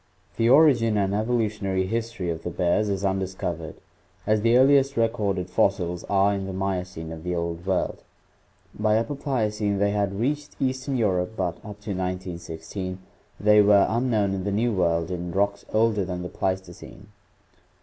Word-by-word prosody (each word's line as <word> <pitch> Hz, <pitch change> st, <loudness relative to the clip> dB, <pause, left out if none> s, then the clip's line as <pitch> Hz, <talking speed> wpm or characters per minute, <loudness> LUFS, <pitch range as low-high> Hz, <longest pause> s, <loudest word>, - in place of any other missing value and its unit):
The 115 Hz, +1 st, +3 dB
origin 125 Hz, -6 st, +5 dB
and 100 Hz, -1 st, +1 dB
evolutionary 105 Hz, -4 st, 0 dB
history 115 Hz, -3 st, -3 dB
of 80 Hz, 0 st, -5 dB
the 90 Hz, -, -4 dB
bears 90 Hz, +4 st, +1 dB
is 100 Hz, 0 st, -1 dB
undiscovered, 95 Hz, -4 st, -3 dB, 0.5 s
as 105 Hz, 0 st, +2 dB
the 115 Hz, +2 st, +4 dB
earliest 135 Hz, 0 st, +4 dB
recorded 105 Hz, -5 st, 0 dB
fossils 90 Hz, -2 st, 0 dB
are 100 Hz, 0 st, +3 dB
in 95 Hz, -1 st, -3 dB
the 95 Hz, -, -5 dB
Miocene 90 Hz, -4 st, -3 dB
of 80 Hz, -1 st, -8 dB
the 90 Hz, 0 st, -2 dB
Old 85 Hz, 0 st, -3 dB
World; 95 Hz, -1 st, -1 dB, 0.7 s
by 105 Hz, 0 st, +2 dB
Upper 115 Hz, +5 st, -1 dB
Pliocene 110 Hz, -7 st, -1 dB
they 100 Hz, +1 st, +2 dB
had 100 Hz, -1 st, -1 dB
reached 145 Hz, +5 st, -2 dB
eastern 130 Hz, +1 st, -1 dB
Europe 95 Hz, -3 st, 0 dB
but 90 Hz, -3 st, -3 dB
up 105 Hz, -1 st, -9 dB
to 105 Hz, -, -5 dB
191 90 Hz, -2 st, -3 dB
6 80 Hz, 0 st, -10 dB, 0.6 s
they 105 Hz, 0 st, +6 dB
were 100 Hz, -1 st, +5 dB
unknown 110 Hz, -4 st, +1 dB
in 95 Hz, -1 st, -3 dB
the 100 Hz, -, -1 dB
New 115 Hz, +3 st, +1 dB
World 85 Hz, -2 st, +1 dB
in 90 Hz, -1 st, -4 dB
rocks 100 Hz, +1 st, 0 dB
older 110 Hz, -2 st, +2 dB
than 90 Hz, -1 st, -4 dB
the 90 Hz, -, -5 dB
Pleistocene. 95 Hz, +1 st, -5 dB
100 Hz, 165 wpm, -25 LUFS, 90-110 Hz, 0.7 s, they